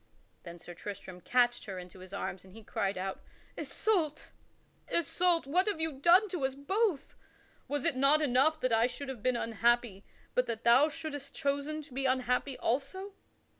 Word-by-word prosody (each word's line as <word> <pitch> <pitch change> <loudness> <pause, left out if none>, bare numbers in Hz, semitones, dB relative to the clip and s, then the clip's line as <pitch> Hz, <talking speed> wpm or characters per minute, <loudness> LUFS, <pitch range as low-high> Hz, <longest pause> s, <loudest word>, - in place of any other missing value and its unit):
Then 170 0 -10
Sir 175 +1 -10
Tristram 185 -1 -8
catched 245 +4 +2
her 195 -3 -6
into 180 +1 -10
his 185 0 -11
arms 190 -2 -4
and 190 -1 -16
he 225 - -11
cried 195 -2 -2
out: 190 +1 -4 0.3
"Isoult! 330 -9 -1 0.6
Isoult! 340 0 +2
what 360 +8 +1
hast 415 - 0
thou 320 0 0
done 345 +9 +5
to 355 -6 -3
us 265 0 0
both? 370 +3 -1 0.5
Was 290 -2 -2
it - - +3
not 275 +3 +4
enough 300 +2 +3
that 255 -2 +1
I 225 +2 +4
should 265 +2 -7
have 255 -5 -6
been 255 +1 +1
unhappy 230 -3 +1 0.3
but 250 - +1
that 230 -1 -4
thou 250 +6 +6
shouldst 290 -2 -6
have - - -7
chosen 285 +2 -1
to 280 - -15
be 270 +1 0
unhappy 255 +1 0
also?" 290 - -2
265 Hz, 180 wpm, -31 LUFS, 230-310 Hz, 0.6 s, thou